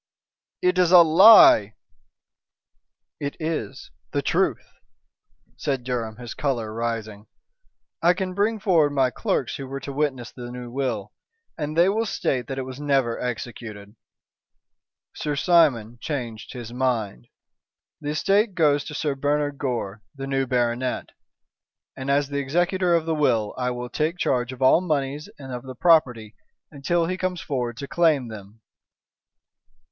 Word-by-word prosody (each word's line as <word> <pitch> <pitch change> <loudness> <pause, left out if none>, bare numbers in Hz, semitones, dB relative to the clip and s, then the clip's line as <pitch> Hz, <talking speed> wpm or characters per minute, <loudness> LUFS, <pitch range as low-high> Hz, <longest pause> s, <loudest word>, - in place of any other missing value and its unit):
"It 180 0 +2
is 180 -1 +3
a 180 -2 +9
lie!" 160 - +7 1.4
"It 145 0 -4
is 155 -10 -4 0.2
the - - 0
truth," - - 0 0.9
said 135 -3 -2
Durham, 120 -3 -3
his 120 -2 -7
color 120 -7 -2
rising. 110 -2 -4 0.7
"I 175 +2 +4
can 185 0 -3
bring 210 +3 0
forward 170 -8 +3
my 130 -2 +2
clerks 125 - -2
who 135 - -7
were 135 +1 -5
to 140 - -6
witness 135 -4 -2
the 120 -1 -9
new 125 -1 -8
will, 120 -6 -3 0.4
and 150 0 -4
they 170 +2 +5
will 220 +3 0
state 125 - -1
that 135 - -5
it 135 - -2
was 130 +1 -8
never 135 -5 0
executed. 115 -3 -6 1.2
Sir 150 -1 -3
Simon 135 -9 +2
changed 120 -8 -5
his 120 -2 -8
mind. 115 - -2 0.7
The 145 - -5
estate 195 +6 +1
goes 145 -4 +3
to 150 - -7
Sir 145 -1 -1
Bernard 145 +1 -1
Gore, 115 -6 -3
the 135 0 -6
new 135 -1 -1
baronet, 125 0 -1 0.9
and 130 +1 -6
as 140 0 +2
the 140 0 -2
executor 175 +5 +1
of 165 -1 0
the 165 - 0
will, 120 -9 +1
I 125 -1 -1
will 125 0 -4
take 160 +3 -1
charge 125 -6 0
of 130 0 -5
all 130 +6 +5
monies 145 -4 -2
and 135 -2 -9
of 125 - -5
the 130 0 -9
property 125 -9 +2 0.4
until 165 +4 0
he 185 +2 -3
comes 185 -1 -2
forward 125 -5 -3
to 140 - -6
claim 155 -8 +2
them." 105 0 -11
135 Hz, 150 wpm, -24 LUFS, 120-155 Hz, 1.4 s, a